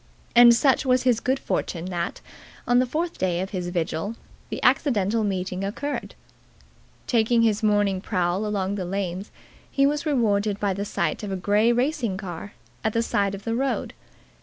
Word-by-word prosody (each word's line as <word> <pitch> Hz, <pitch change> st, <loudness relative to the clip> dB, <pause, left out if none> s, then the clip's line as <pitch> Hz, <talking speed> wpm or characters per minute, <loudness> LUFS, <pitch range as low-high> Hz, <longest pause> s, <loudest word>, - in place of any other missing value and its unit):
And 240 Hz, 0 st, +9 dB
such 265 Hz, +2 st, +3 dB
was 255 Hz, -2 st, +2 dB
his 245 Hz, -3 st, +3 dB
good 260 Hz, +3 st, 0 dB
fortune 170 Hz, -9 st, -3 dB
that, 175 Hz, -1 st, -3 dB, 0.5 s
on 245 Hz, 0 st, +4 dB
the 255 Hz, -, +2 dB
fourth 330 Hz, +6 st, -3 dB
day 180 Hz, -2 st, 0 dB
of 190 Hz, +1 st, -3 dB
his 180 Hz, -2 st, -3 dB
vigil, 175 Hz, +4 st, -2 dB, 0.3 s
the -, -, -4 dB
accidental 230 Hz, -5 st, +2 dB
meeting 185 Hz, -1 st, -2 dB
occurred. 285 Hz, +9 st, -4 dB, 0.9 s
Taking 230 Hz, 0 st, +3 dB
his 220 Hz, -1 st, +2 dB
morning 205 Hz, -3 st, +2 dB
prowl 185 Hz, 0 st, 0 dB
along 200 Hz, -2 st, -1 dB
the 195 Hz, -3 st, -3 dB
lanes, 190 Hz, +1 st, -3 dB, 0.4 s
he 275 Hz, -, +2 dB
was 295 Hz, +3 st, 0 dB
rewarded 210 Hz, -7 st, +1 dB
by 200 Hz, -2 st, 0 dB
the 200 Hz, +2 st, -3 dB
sight -, -, -1 dB
of 205 Hz, -2 st, -5 dB
a -, -, -1 dB
grey 205 Hz, +5 st, +2 dB
racing 245 Hz, -5 st, 0 dB
car 190 Hz, +1 st, -7 dB, 0.3 s
at 220 Hz, -, 0 dB
the 230 Hz, -, +1 dB
side 200 Hz, -3 st, 0 dB
of 195 Hz, -, -10 dB
the 225 Hz, -, -2 dB
road. 270 Hz, +3 st, -1 dB
210 Hz, 175 wpm, -24 LUFS, 190-245 Hz, 0.9 s, And